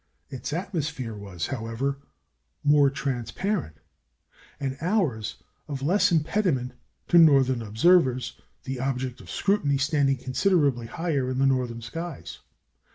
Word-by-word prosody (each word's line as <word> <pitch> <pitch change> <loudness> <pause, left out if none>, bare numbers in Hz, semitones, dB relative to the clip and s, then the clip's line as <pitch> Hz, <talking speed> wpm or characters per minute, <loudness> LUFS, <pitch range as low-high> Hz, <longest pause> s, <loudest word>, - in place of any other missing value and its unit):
Its 130 +1 -5
atmosphere 155 - -3
was, 100 -5 -5
however, 135 +2 -3 0.6
more 145 -1 +5
transparent, 140 - -3 0.8
and 135 -1 -2
ours 165 - 0 0.3
of 140 -3 -5
less 180 +7 +3
impediment 160 -5 +1 0.4
to 175 - +6
northern 135 -6 +5
observers, 130 - +2 0.2
the 130 -1 -4
object 130 -1 -3
of - - -14
scrutiny 180 -9 +1
standing 140 -1 +2
considerably 135 -2 +1
higher 150 -3 -1
in 130 - -2
northern 125 -3 -1
skies. 165 +6 -7
135 Hz, 110 wpm, -26 LUFS, 125-165 Hz, 0.8 s, to